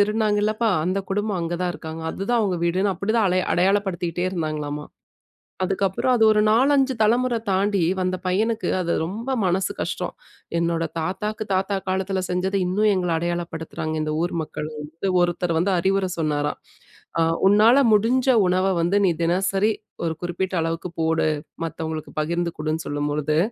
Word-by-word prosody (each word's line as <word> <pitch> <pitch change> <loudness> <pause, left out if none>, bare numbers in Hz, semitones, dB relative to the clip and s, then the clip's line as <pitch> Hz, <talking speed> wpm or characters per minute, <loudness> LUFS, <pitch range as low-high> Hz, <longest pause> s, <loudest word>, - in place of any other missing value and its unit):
திருடுனாங்கலப்பா 215 +1 +2
அந்த 185 +3 0
குடும்பம் 205 0 -1
அங்க 170 +1 -2
தான் 180 - 0
இருக்காங்க. 160 0 -7
அதுதான் 230 +5 0
அவங்க 190 -4 0
வீடுன்னு" 190 +4 +1
அப்டிதான் 215 +4 +1
அடை 185 +1 +2
அடையாளப்படுத்திகிட்டே 180 -2 +1
இருந்தாங்களாமா. 150 -4 -3 0.8
அதுக்கு 195 +1 -1
அப்றம் 250 +7 0
அது 225 - +3
ஒரு 210 0 +3
நாலஞ்சு 270 +3 +3
தலைமுற 240 +3 +3
தாண்டி 195 +1 +1 0.2
வந்த 185 0 0
பையனுக்கு 220 +5 0
அது 170 -1 -1
ரொம்ப 220 +9 -5 0.2
மனசு 185 +1 +1
கஷ்டம். - - -3 0.4
என்னோட 170 0 0 0.2
தாத்தாவுக்கு 210 +6 -3
தாத்தா 195 +2 0
காலத்துல 190 0 -1
செஞ்சது 185 +2 0
இன்னும் 205 +4 +2
எங்கள 180 -1 -1
அடையாளப்படுத்துறாங்க. 165 -2 -3
இந்த 155 0 -2
ஊர் 175 - -1
மக்கள் 150 0 -6
வந்து 160 +6 -4
ஒருத்தர் 175 0 0
வந்து 180 +5 +2
அறிவுர 195 +2 +1
சொன்னாராம். 150 -2 -1 0.6
அ - - +4 0.2
உன்னால 215 +5 +6 0.2
முடிஞ்ச 240 +5 +2 0.2
உணவ 185 +1 +2 0.2
வந்து 175 +4 +1
நீ 180 - +4
தினசரி 195 +5 +2 0.3
ஒரு 165 - 0
குறிப்பிட்ட 180 +2 -3
அளவுக்கு 165 +2 -2
போடு. 160 0 +2 0.4
மத்தவங்களுக்கு 160 -1 -5
பகிர்ந்து 170 +2 -1
குடுன்னு 155 +1 -2
சொல்லும் 145 0 -2
பொழுது. 150 +1 0
185 Hz, 150 wpm, -23 LUFS, 165-205 Hz, 0.8 s, உன்னால